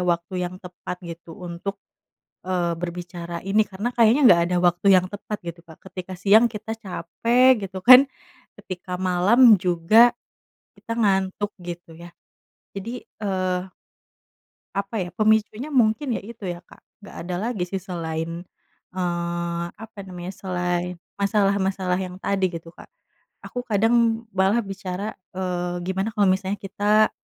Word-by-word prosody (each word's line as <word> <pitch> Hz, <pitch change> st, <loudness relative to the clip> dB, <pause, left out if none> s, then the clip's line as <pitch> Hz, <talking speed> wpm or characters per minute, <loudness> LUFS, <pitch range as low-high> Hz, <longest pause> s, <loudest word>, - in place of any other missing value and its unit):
waktu 170 Hz, +2 st, -1 dB
yang 180 Hz, +1 st, -5 dB
tepat 180 Hz, 0 st, -7 dB
gitu 170 Hz, 0 st, -9 dB
untuk, 180 Hz, +2 st, -6 dB, 0.7 s
eee, 180 Hz, -2 st, 0 dB
berbicara 175 Hz, -1 st, -5 dB
ini?" 200 Hz, +3 st, +2 dB
Karena 200 Hz, +4 st, -3 dB
kayaknya 235 Hz, +3 st, +5 dB
nggak 170 Hz, -1 st, +6 dB
ada 180 Hz, -, +1 dB
waktu 175 Hz, +2 st, +2 dB
yang 180 Hz, -, +3 dB
tepat 210 Hz, +1 st, -5 dB
gitu, 170 Hz, 0 st, -6 dB
Kak. 160 Hz, -2 st, -15 dB
Ketika 185 Hz, 0 st, -7 dB
siang 210 Hz, +5 st, +6 dB
kita 220 Hz, 0 st, -6 dB
capek 230 Hz, +4 st, +2 dB
gitu 190 Hz, 0 st, -7 dB
kan, 255 Hz, +2 st, +9 dB, 0.5 s
ketika 180 Hz, -2 st, -6 dB
malam 200 Hz, +6 st, +6 dB
juga 185 Hz, +7 st, +5 dB, 0.7 s
kita 230 Hz, -, -6 dB
ngantuk 195 Hz, -1 st, +1 dB
gitu 175 Hz, -1 st, -8 dB
ya. 175 Hz, 0 st, -10 dB, 0.7 s
Jadi, 230 Hz, +5 st, -6 dB, 0.2 s
eee 185 Hz, -2 st, -1 dB, 1.1 s
apa 200 Hz, +3 st, -3 dB
ya, 175 Hz, -, -7 dB
pemicunya 220 Hz, +4 st, +1 dB
mungkin 245 Hz, +1 st, +2 dB
ya -, -, -6 dB
itu 220 Hz, -3 st, -8 dB
ya, 175 Hz, -1 st, -4 dB
Kak, -, -, -18 dB, 0.2 s
nggak -, -, -12 dB
ada 180 Hz, 0 st, -3 dB, 0.2 s
lagi 205 Hz, -7 st, -2 dB
sih 195 Hz, +1 st, -3 dB
selain, 165 Hz, -2 st, -4 dB, 0.5 s
eee, 170 Hz, -1 st, -2 dB
apa 220 Hz, -1 st, -12 dB
namanya, 180 Hz, 0 st, -7 dB
selain 180 Hz, -1 st, -2 dB, 0.2 s
masalah-masalah 195 Hz, -2 st, +1 dB
yang 185 Hz, -1 st, -5 dB
tadi 190 Hz, -2 st, 0 dB
gitu, 165 Hz, -1 st, -8 dB
Kak. -, -, -15 dB, 0.6 s
Aku 245 Hz, -, -4 dB
kadang 230 Hz, +1 st, +2 dB
malah 195 Hz, +4 st, +3 dB
bicara, 195 Hz, +1 st, -5 dB, 0.2 s
"Eee, 180 Hz, -1 st, -2 dB
gimana 190 Hz, +3 st, -1 dB
kalo 205 Hz, -2 st, +3 dB
misalnya 190 Hz, +1 st, 0 dB
kita, 210 Hz, +2 st, +2 dB
190 Hz, 140 wpm, -23 LUFS, 175-215 Hz, 1.1 s, kan